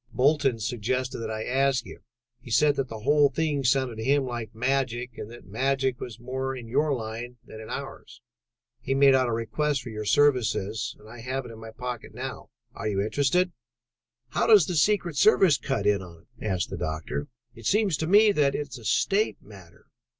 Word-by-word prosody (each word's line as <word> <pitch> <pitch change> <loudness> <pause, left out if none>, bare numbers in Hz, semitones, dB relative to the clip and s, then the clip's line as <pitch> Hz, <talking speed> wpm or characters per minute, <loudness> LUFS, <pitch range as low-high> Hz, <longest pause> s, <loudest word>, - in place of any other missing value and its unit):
Bolton 135 -2 +2
suggested 125 +3 -2
that 115 -1 -4
I 110 0 -3
ask 130 -1 +1
you: 95 - -11 0.4
he 120 - -13
said 145 +5 +4
that 135 - -1
the 110 -2 -8
whole 145 +4 +4
thing 150 -3 -1
sounded 125 -2 +1
to 110 - -4
him 140 +3 +3
like 120 -3 -5
magic 125 -1 -1
and 105 - -7
that 120 +1 -12
magic 130 +4 0
was 120 -2 -7
more 130 +2 -3
in 120 -3 -8
your 150 +6 +1
line 120 0 -4
than 110 - -10
in 110 - -10
ours. - - -7 0.6
He 135 - -2
made 135 0 +6
out 130 -1 +3
a - - -1
request 125 +5 -1
for 125 - -7
your 110 -1 -5
services 115 -5 +1
and 105 - -17
I 115 +2 -11
have 130 +2 -3
it 120 - -9
in 110 - -11
my 115 0 -9
pocket 120 0 -7
now. 130 +1 -6 0.2
Are 110 - -5
you 100 -2 -1
interested?" 145 - +1 0.8
"How - - 0
does 210 -7 +7
the 180 - -3
secret 175 -1 +2
service 180 -5 +5
cut 135 +2 -2
in 100 -1 +3
on 85 -3 -12
it?" 120 -2 -13
asked 95 -4 -1
the - - -4
doctor. 80 -2 -4 0.3
"It 115 -1 -7
seems 205 -5 +2
to 160 - -2
me 210 +3 +6
that 145 -6 +2
it 145 -1 -3
is 135 - -8
a 115 - -13
state 200 - +1
matter. 95 -5 -16
125 Hz, 205 wpm, -26 LUFS, 110-140 Hz, 0.8 s, does